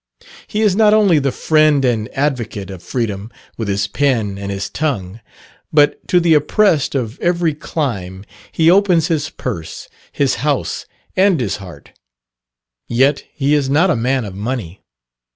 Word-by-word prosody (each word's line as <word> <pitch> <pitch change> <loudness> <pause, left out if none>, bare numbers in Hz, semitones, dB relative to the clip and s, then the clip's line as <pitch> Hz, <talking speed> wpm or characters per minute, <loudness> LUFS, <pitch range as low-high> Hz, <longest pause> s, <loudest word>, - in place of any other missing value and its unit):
He 215 +1 -1
is 205 -4 +3
not 215 0 +5
only 200 -7 +4
the 135 -1 0
friend 155 -1 +3
and 115 -2 0
advocate 120 -8 -2
of 95 -3 -9
freedom 110 -4 -3 0.3
with 110 - -4
his 100 0 0
pen 115 -6 0
and 100 0 -6
his 100 0 -3
tongue, 115 -10 -3 0.5
but 145 -1 +3
to 180 - +4
the 170 -1 +3
oppressed 155 0 +2
of 120 -2 -3
every 170 -2 +1
clime 100 - -4 0.3
he 165 +1 +4
opens 180 -4 +3
his 155 -3 -1
purse, 95 -11 -6 0.2
his - - 0
house, - - -1 0.3
and 190 -4 +3
his 110 -6 -2
heart: 90 -8 -12 1.0
yet 135 +4 +2
he 140 0 0
is 145 -3 +1
not 160 +7 +3
a - - +1
man 125 +1 0
of 100 - -7
money. 100 -3 -5
135 Hz, 155 wpm, -17 LUFS, 105-160 Hz, 1.0 s, not